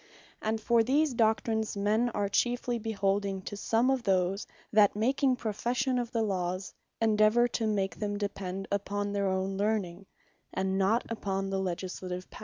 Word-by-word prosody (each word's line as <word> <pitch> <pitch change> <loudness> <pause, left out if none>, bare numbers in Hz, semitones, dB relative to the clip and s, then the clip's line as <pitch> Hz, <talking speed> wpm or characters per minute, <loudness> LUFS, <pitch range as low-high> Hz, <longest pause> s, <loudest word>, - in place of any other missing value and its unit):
And 220 +1 -1
for 230 +1 +3
these 280 +5 +2
doctrines, 220 -1 +1
men 215 +4 +2
are 205 - +1
chiefly 240 +3 0
beholding 200 -3 -1
to 205 - -6
some 225 +5 +2
of 265 -1 +1
those, 190 -1 +1 0.3
that 205 -2 +5
making 260 +4 +2
profession 245 +3 -1
of 240 -1 -3
the 230 -2 +1
Lawes, 185 -2 -2 0.3
endeavour 220 +2 +4
to 225 -1 -1
make 195 -2 -1
them 205 -1 -2
depend 195 -2 -4
upon 200 0 -1
their 200 -1 0
own 190 +1 -1
learning, 200 -3 -1 0.5
and 190 0 0
not 210 +5 +2
upon 195 -3 -2
the 195 - 0
Legislative 185 0 -4
Power. - - -11
205 Hz, 160 wpm, -30 LUFS, 195-230 Hz, 0.5 s, that